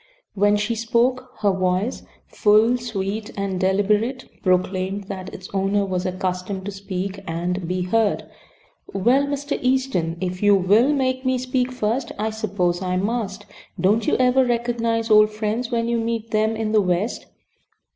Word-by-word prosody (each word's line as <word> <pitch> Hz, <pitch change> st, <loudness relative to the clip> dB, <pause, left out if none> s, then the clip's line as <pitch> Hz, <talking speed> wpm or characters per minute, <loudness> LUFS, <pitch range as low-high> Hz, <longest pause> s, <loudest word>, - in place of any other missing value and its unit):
When 205 Hz, +1 st, +3 dB
she 205 Hz, +3 st, -1 dB
spoke 240 Hz, +3 st, 0 dB
her 205 Hz, -1 st, +3 dB
voice, 185 Hz, +5 st, 0 dB, 0.2 s
full, 215 Hz, +3 st, +3 dB
sweet, 210 Hz, -2 st, -3 dB
and 195 Hz, -2 st, -2 dB
deliberate, 205 Hz, +6 st, +1 dB
proclaimed 185 Hz, +1 st, 0 dB
that 190 Hz, -2 st, -6 dB
its 185 Hz, -, -9 dB
owner 200 Hz, +1 st, +1 dB
was 185 Hz, -1 st, -2 dB
accustomed 185 Hz, +1 st, -3 dB
to 205 Hz, -, -3 dB
speak 195 Hz, 0 st, -5 dB
and 175 Hz, +2 st, -2 dB
be 180 Hz, +1 st, -1 dB
heard. 210 Hz, +3 st, +1 dB, 0.7 s
"Well, 250 Hz, +8 st, +3 dB
Mr. 285 Hz, 0 st, -2 dB
Easton, 255 Hz, -11 st, 0 dB
if 185 Hz, 0 st, -3 dB
you 205 Hz, -1 st, +5 dB
~will~ 205 Hz, +8 st, +4 dB
make 260 Hz, -2 st, 0 dB
me 260 Hz, -1 st, +1 dB
speak 255 Hz, 0 st, -1 dB
first, 245 Hz, +1 st, -1 dB
I 215 Hz, +1 st, -1 dB
suppose 195 Hz, -5 st, -1 dB
I 185 Hz, -1 st, -1 dB
must. 205 Hz, 0 st, -2 dB, 0.3 s
Don't 205 Hz, +6 st, +3 dB
vou -, -, +2 dB
ever 255 Hz, +1 st, +4 dB
recognize 230 Hz, -2 st, 0 dB
old 215 Hz, 0 st, +7 dB
friends 215 Hz, +3 st, -2 dB
when 230 Hz, -1 st, 0 dB
you 235 Hz, 0 st, +1 dB
meet 230 Hz, 0 st, -3 dB
them 220 Hz, +1 st, +1 dB
in 220 Hz, -1 st, -2 dB
the 215 Hz, -1 st, +4 dB
West?" 185 Hz, +4 st, -1 dB
210 Hz, 155 wpm, -22 LUFS, 190-235 Hz, 0.7 s, old